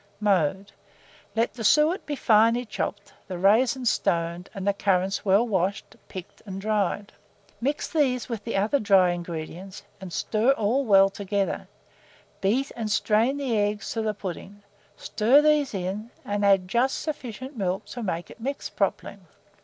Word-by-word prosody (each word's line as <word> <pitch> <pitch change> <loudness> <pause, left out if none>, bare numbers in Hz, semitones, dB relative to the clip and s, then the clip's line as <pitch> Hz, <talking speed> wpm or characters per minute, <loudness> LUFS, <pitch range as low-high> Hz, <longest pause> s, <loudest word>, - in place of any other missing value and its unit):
Mode. 195 -1 +1 0.6
Let 230 +1 +1
the 230 - -7
suet 305 - +3
be 295 - -2
finely 230 0 +3
chopped, 205 -2 -5
the 185 - -5
raisins 230 +6 +3
stoned, 170 -1 -1
and 195 0 -4
the 200 - +3
currants 195 -1 0
well 205 +4 +3
washed, 195 -1 -1
picked, 185 -2 -10
and 190 0 -5
dried. 205 -1 -1 0.5
Mix 285 +4 -1
these 260 -6 0
with 230 -5 -5
the 230 -2 -2
other 215 +8 +2
dry 195 -5 +4
ingredients, 175 +2 -6 0.2
and 190 -2 -8
stir 220 +9 +2
all 255 +4 0
well 195 -3 +5
together; 200 0 -2 0.7
beat 245 +8 +1
and 225 -2 -3
strain 225 +6 +2
the 265 -5 -1
eggs 205 0 -1
to 225 - -1
the 215 -1 -1
pudding, 200 +1 -7 0.3
stir 235 +6 +3
these 300 -2 +3
in, 195 +4 -4 0.2
and 205 0 -2
add 195 -2 +4
just 240 +7 +1
sufficient 265 -3 -6
milk 190 -3 -2
to 245 - -7
make 175 -5 -3
it - - -14
mix 275 +4 -4
properly. - - -2
210 Hz, 155 wpm, -25 LUFS, 195-240 Hz, 0.7 s, well